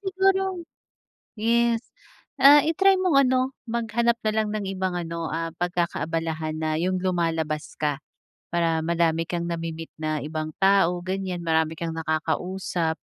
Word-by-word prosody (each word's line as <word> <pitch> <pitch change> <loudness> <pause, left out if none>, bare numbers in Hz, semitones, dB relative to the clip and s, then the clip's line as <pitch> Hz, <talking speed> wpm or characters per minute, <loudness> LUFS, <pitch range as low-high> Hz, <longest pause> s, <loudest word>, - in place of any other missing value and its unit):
siguro 385 -2 +1 0.8
yes, 235 +1 +2 0.6
ah, 285 +2 +10
i-try 370 +6 +3
mong 320 -7 +4
ano, 260 +1 +1 0.2
maghanap 235 0 +1
na 215 - 0
lang 215 -1 0
ng 210 -1 -3
ibang 185 -2 -2
ano, 165 -1 -4
ah, 165 +1 -3
pagkakaabalahan 165 -2 -2
na 155 -1 -1
'yong 180 +3 0
lumalabas 165 -4 -2
ka, 150 -1 -1 0.4
para 165 -1 +1
madami 165 0 +1
kang 175 -1 -2
nami-meet 165 -1 -5
na 155 -2 -2
ibang 155 +1 -4
tao, 190 -3 +3
ganiyan, 185 -2 -3
marami 160 -1 +1
kang 165 0 -4
nakakausap. 160 +1 -1
175 Hz, 135 wpm, -25 LUFS, 160-225 Hz, 0.8 s, ah